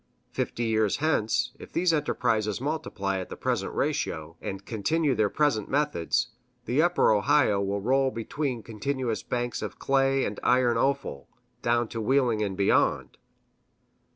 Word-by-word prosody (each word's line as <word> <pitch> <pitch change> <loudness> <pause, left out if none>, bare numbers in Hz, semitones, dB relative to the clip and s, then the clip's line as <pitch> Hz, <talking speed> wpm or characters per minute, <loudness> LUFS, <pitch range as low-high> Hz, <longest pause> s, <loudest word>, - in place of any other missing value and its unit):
Fifty 120 - -2
years 110 -2 +1
hence, 125 -5 +1
if - - -11
these 170 0 +2
enterprises 110 -8 0
multiply 110 -9 -2
at 95 - -6
the - - -6
present - - -1
ratio, 80 +1 -2
and 95 0 -6
continue 140 +7 0
their 110 -4 +2
present 140 -7 +1
methods, 130 - 0 0.4
the 130 +6 +2
Upper 175 -6 +3
Ohio 110 -1 +3
will 100 0 -1
roll 135 +4 +2
between 120 +1 -3
continuous 115 +2 -3
banks 120 0 -3
of - - -5
clay 135 0 +2
and 100 - -4
iron 125 -1 +3
offal, 135 - -1 0.3
down 120 0 +1
to 115 - -4
Wheeling 120 -2 +2
and 100 -3 -2
beyond. 100 - +1
120 Hz, 145 wpm, -27 LUFS, 105-140 Hz, 0.4 s, Upper